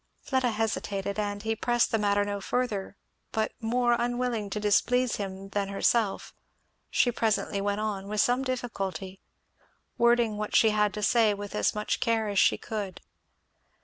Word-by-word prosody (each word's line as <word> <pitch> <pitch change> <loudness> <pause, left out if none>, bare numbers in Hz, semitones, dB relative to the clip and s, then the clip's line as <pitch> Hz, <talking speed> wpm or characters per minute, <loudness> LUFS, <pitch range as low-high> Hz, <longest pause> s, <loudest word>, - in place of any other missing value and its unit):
Fleda 260 -2 0
hesitated, 210 -2 -2
and 205 0 -3
he 225 0 0
pressed 240 +2 +1
the 225 - +1
matter 205 0 +2
no 200 0 -3
further; 205 -5 -2 0.3
but 220 0 0
more 240 +1 +2
unwilling 240 -3 -1
to 210 - -3
displease 240 +4 +2
him 195 -1 -6
than 200 0 -1
herself 200 +1 0 0.6
she 245 - +3
presently 215 -3 0
went 205 +1 -1
on, 200 -2 -3
with 210 +1 -2
some 245 +4 +3
difficulty; 195 -7 -4 0.8
wording 235 -2 +3
what 210 0 -3
she 220 - +6
had 210 -1 +2
to 210 - -4
say 220 0 +4
with 205 0 -7
as - - +1
much 210 0 -1
care 225 -2 +1
as 200 -1 +1
she - - +4
could. 205 -5 -5
215 Hz, 160 wpm, -28 LUFS, 200-235 Hz, 0.8 s, she